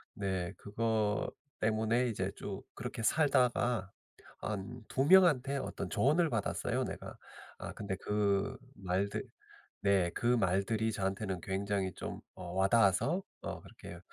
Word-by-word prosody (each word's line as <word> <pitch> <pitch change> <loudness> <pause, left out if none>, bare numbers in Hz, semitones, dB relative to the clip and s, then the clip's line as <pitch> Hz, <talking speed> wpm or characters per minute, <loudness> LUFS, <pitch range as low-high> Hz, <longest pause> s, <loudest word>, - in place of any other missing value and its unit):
네 95 -3 -2
그거 110 0 0 0.3
때문에 110 +3 +2
이제 95 -3 -2
쭉 100 -1 -6
그렇게 120 0 -5
살다가 125 -8 +2 0.5
한 105 +4 -4
2 135 - +1
명한테 150 -6 +6
어떤 135 - -4
조언을 155 +4 +3
받았어요, 110 -4 -1
내가. - - -6 0.4
아 - - -5
근데 100 -3 -3
그 100 -1 0 0.2
말들 95 +1 -1 0.6
네 95 -4 +3
그 - - -4
말들이 110 0 +2
저한테는 95 -1 -2
굉장히 95 0 -1
좀 - - -5 0.2
어 90 -2 -7
와 95 +1 +4
닿아서 115 - +3 0.2
어 - - -5
그렇게 - - -11
105 Hz, 245 characters per minute, -33 LUFS, 95-120 Hz, 0.6 s, 명한테